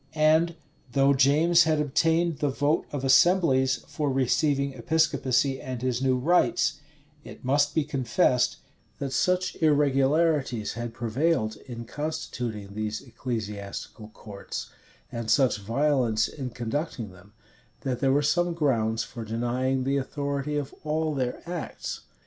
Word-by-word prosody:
And 160 +2 +3 0.4
though 140 +1 +4
James 155 +5 +4
had 155 -1 +2
obtained 160 +2 +1
the 145 - +1
vote 145 +3 0
of 145 -2 -4
assemblies 130 -4 +4
for 150 -2 -2
receiving 140 +1 +1
Episcopacy 135 -1 +1
and 130 -2 -6
his 130 -1 0
new 130 -1 +2
rites; 175 +5 +2 0.4
it - - -12
must 145 +2 +2
be 160 - +3
confessed, 130 -3 +1 0.4
that 140 -2 -4
such 180 +6 +1
irregularities 145 -4 +2
had 120 0 -6
prevailed 115 -1 0
in 120 -2 -7
constituting 120 -8 -5
these 110 0 -3
ecclesiastical 105 -4 -6
courts, 105 -2 -8 0.4
and 115 -1 -5
such 130 -6 +3
violence 115 0 +1
in 130 -4 -6
conducting 120 - -4
them, 90 +3 -18 0.5
that 130 -3 -2
there 135 -1 +2
were 145 +2 +2
some 175 +3 +1
grounds 115 -8 +1
for 120 -3 -8
denying 120 +4 -1
the 135 +2 +1
authority 140 +1 -2
of 140 -2 -4
all 155 0 -1
their 130 +2 -3
acts. 175 -2 -5
135 Hz, 130 wpm, -26 LUFS, 120-150 Hz, 0.5 s, though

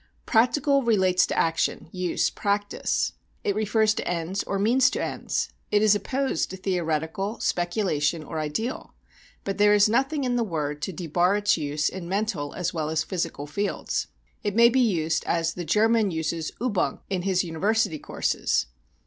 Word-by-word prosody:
Practical 265 +4 +3
relates 190 -7 +3
to - - -3
action, 165 0 0
use, 180 -2 0
practice; 205 0 -1 0.3
it 200 - +1
refers 215 +1 +2
to - - -4
ends 175 +3 -2
or 200 - -2
means 240 +6 +4
to - - -3
ends; - - -2 0.2
it 210 0 +3
is 215 -1 +6
opposed 255 +1 -1
to 190 - -7
theoretical, 180 +2 -2
speculation 175 -4 0
or 155 - -5
ideal. 155 - -4 0.5
But 195 0 -4
there 210 0 +6
is 205 0 +5
nothing 270 +6 +1
in 245 -1 0
the 235 - +2
word 150 -7 -3
to 190 - -2
debar 175 +2 +1
its 205 0 +2
use 150 -1 -1
in 180 -2 -5
mental 195 -7 -2
as 180 - -2
well 155 -2 -2
as 160 0 0
physical 165 -5 -3
fields. 200 +8 -2 0.3
It 205 -1 -2
may 235 +1 +7
be 260 +2 +2
used 165 -8 +1
as 165 0 0
the 175 - -5
German 220 +5 +3
uses 160 -1 -2
übung 225 -4 -1
in 190 -2 -2
his 185 0 +1
university 175 0 0
courses. - - 0
190 Hz, 165 wpm, -25 LUFS, 165-215 Hz, 0.5 s, may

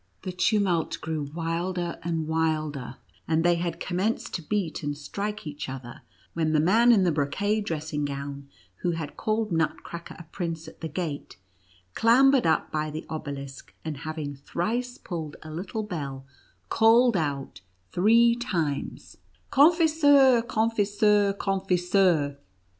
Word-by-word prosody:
The 185 - -3
tumult 185 -3 +1
grew 155 -3 -3
wilder 170 +2 -2
and 165 -1 -2
wilder, 155 -5 -1 0.3
and 160 0 +2
they 175 0 +4
had 170 -1 -3
com 180 0 -3
menced 220 +4 -1
to 175 - -3
beat 175 -2 -2
and 145 -1 -3
strike 205 +8 -5
each 145 -2 -6
other, 130 -2 -8 0.3
when 160 -2 0
the 155 - +4
man 225 +10 +5
in 205 -5 +5
the 175 - +3
brocade 200 +9 0
dressing 155 -3 -2
gown, 140 0 -6 0.3
who 175 - -1
had 160 -3 -5
called 215 -1 -1
Nutcracker 165 +1 -3
a - - -9
prince 165 -3 -4
at - - -13
the 165 - -3
gate, 155 -2 -5 0.6
clam 255 +4 +5
bered 265 -9 +3
up 160 - +1
by 155 0 -1
the 155 +1 -6
obelisk, 140 -3 -7
and 155 -3 -4
having 155 -1 -5
thrice 230 - -3
pulled 160 -5 -6
a 155 - -9
little 200 +7 -4
bell, 140 -9 -5 0.4
called 230 +1 +5
out 145 -5 -2 0.3
three 230 +5 +5
times: 170 - -3 0.3
"Confiseur! 290 -4 +5
confiseur! 210 -3 +2
confiseur!" 180 -6 +1
170 Hz, 140 wpm, -26 LUFS, 155-210 Hz, 0.6 s, man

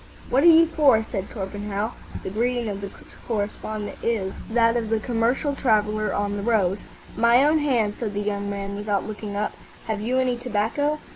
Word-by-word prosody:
"What 265 - +4
are 345 - +6
you 330 0 +8
for?" 290 -9 +4
said 195 -1 -3
Torpenhow. 205 +1 -4 0.3
The - - -4
greeting 240 +2 0
of 200 -1 -5
the 200 - -5 0.4
correspondent 215 -1 -3
is 205 -5 -1 0.2
that 230 0 +3
of 230 -2 -1
the 225 0 +1
commercial 240 +5 0
traveller 215 -4 +1
on 205 0 -1
the - - -3
road. 200 -3 +1 0.4
"My 235 +3 +5
own 310 +1 +4
hand," 240 -8 +1
said 210 -4 -3
the - - 0
young 200 -1 -2
man, 200 0 -4
without 205 -1 -1
looking 210 -1 -6
up. 210 +1 -1 0.3
"Have 215 -2 -2
you 245 +4 0
any 255 -2 +1
tobacco?" 250 +5 0
220 Hz, 185 wpm, -24 LUFS, 205-245 Hz, 0.4 s, you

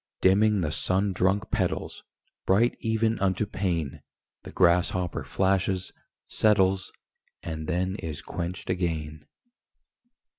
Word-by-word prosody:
Dimming 105 +2 +4
the 75 -3 -1
sun 95 +4 +1
drunk 95 +4 0
petals, - - -2 0.4
Bright 110 +6 +3
even 110 -1 0
unto 95 +2 +1
pain, 85 -8 -2 0.4
The - - -10
grasshopper 90 0 +2
flashes, 95 -1 0 0.3
settles, 95 -2 +2 0.5
And 80 -1 -5
then 90 +2 -1
is 75 -6 -6
quenched 90 +1 -4
again. 80 -4 -3
95 Hz, 105 wpm, -27 LUFS, 85-100 Hz, 0.5 s, Dimming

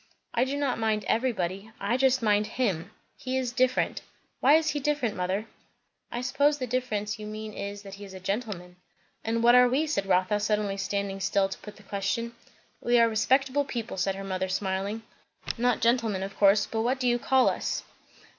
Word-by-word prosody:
"I 245 - +2
do 275 +2 -2
not 280 -5 0
mind 220 -1 0
everybody. 210 -4 -1
I 205 +4 0
just 260 -1 +3
mind 210 -1 +3
him. 195 -11 0 0.3
He 260 0 -2
is 255 -2 -1
different. 255 +1 +1 0.4
Why 280 +4 +6
is 315 -1 +2
he 295 - -2
different, 285 -6 0
mother?" 185 +4 -1 0.7
"I 240 - -3
suppose 285 +3 +2
the 260 - -3
difference 220 -4 -2
you 210 - -6
mean 215 0 -6
is, 200 0 -6
that 195 -1 -10
he 200 +1 -9
is 195 -1 -10
a - - -7
gentleman." 185 -3 -4 0.5
"And 230 +1 0
what 240 +1 +7
are 250 0 +7
we?" 275 +5 +2
said 295 -11 -1
Rotha, 185 +2 +2
suddenly 210 -1 0
standing 195 0 -2
still 195 0 +1
to - - -6
put 210 -1 -10
the 210 - -17
question. 200 +4 -2 0.5
"We 240 0 +3
are 230 -1 +6
respectable 265 +5 +2
people," 235 -6 -5
said 190 +1 0
her 195 - -6
mother 190 -1 -2
smiling. 195 +3 -2 0.5
"Not 245 0 +1
gentlemen, 230 -5 +2
of 195 0 -6
course; 200 0 +5
but 220 - -2
what 250 +3 0
do 250 - 0
you 240 0 +2
call 260 +1 +3
us?" - - -1
220 Hz, 195 wpm, -27 LUFS, 195-250 Hz, 0.7 s, what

